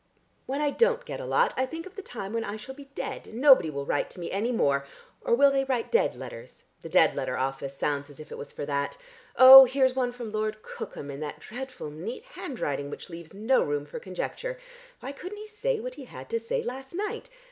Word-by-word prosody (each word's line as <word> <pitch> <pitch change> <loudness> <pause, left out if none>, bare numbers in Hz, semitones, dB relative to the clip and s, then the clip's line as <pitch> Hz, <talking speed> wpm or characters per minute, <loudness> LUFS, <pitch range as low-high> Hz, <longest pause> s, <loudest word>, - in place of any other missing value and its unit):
When 275 +3 -2
I 295 -1 +2
don't 480 - +2
get - - -6
a - - -6
lot, - - +3
I 260 - 0
think 325 +4 -7
of 380 0 -12
the 400 - -6
time 220 - -7
when 230 0 -1
I 205 0 -4
shall 255 +5 -9
be 280 +1 -12
dead, - - -5
and 225 - -8
nobody 265 - +7
will 140 -2 -4
write 145 - 0
to - - -11
me 170 - -5
any 215 +5 0
more. 140 - +2 0.4
Or - - +3
will 280 +2 +6
they 270 -1 +2
write 260 -3 -2
dead 470 - +3
letters? - - -10 0.2
The - - -8
dead - - +5
letter - - -2
office 135 +1 -3
sounds 145 0 -1
as 145 - -14
if 155 - -11
it - - -6
was 145 - -8
for - - -5
that. 140 -1 -2 0.4
Oh, 265 +1 +12
here's 260 0 +2
one 250 -2 +1
from 240 -3 -7
Lord 215 0 -2
Cookham 140 - -7
in 140 - -7
that 150 0 -5
dreadful 250 - -7
neat 200 - -7
handwriting 185 - -4
which 160 - -9
leaves 170 +2 -10
no 225 +6 +3
room 145 0 -1
for 145 - -7
conjecture. - - -5 0.4
Why 265 - -5
couldn't 365 +8 -8
he 425 - -8
say 450 +2 -1
what - - -5
he - - -10
had - - -11
to 460 - +1
say 475 +1 -2
last 265 +5 -6
night? 420 +5 -4
245 Hz, 235 wpm, -27 LUFS, -, 0.4 s, Oh